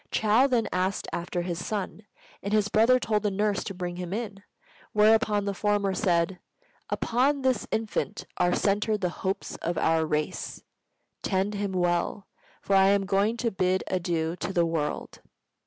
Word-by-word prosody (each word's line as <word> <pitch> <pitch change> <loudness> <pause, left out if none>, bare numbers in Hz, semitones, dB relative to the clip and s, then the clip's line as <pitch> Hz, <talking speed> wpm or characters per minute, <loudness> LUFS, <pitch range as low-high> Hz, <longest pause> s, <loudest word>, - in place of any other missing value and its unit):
Chou 220 +5 +3
then 240 -4 +1
asked 185 +1 -1
after 175 0 -2
his 175 -1 -3
son, 210 0 -4 0.3
and 200 - -4
his 210 -1 +3
brother 230 +5 +5
told 215 -3 0
the 210 - +1
nurse 205 0 0
to 195 - -5
bring 175 -1 -4
him 180 0 -4
in; 205 -3 -4 0.5
whereupon 210 -1 +4
the 200 - -1
former 205 -1 +1
said, 180 -2 +1 0.5
"Upon 270 +4 +1
this 260 -4 +1
infant 220 -1 -2
are 180 0 +2
centered 210 +1 +1
the 180 - +1
hopes 190 +2 -4
of 170 0 -3
our 160 0 +2
race. 150 0 -3 0.6
Tend 195 +1 0
him 200 -1 -2
well; 175 +2 0 0.4
for 195 - +2
I 190 0 +6
am 200 0 +3
going 200 +4 +1
to 230 -1 0
bid 185 0 +1
adieu 170 -3 -1
to - - -3
the 175 -3 +2
world." 160 -3 -3
195 Hz, 165 wpm, -27 LUFS, 180-210 Hz, 0.6 s, I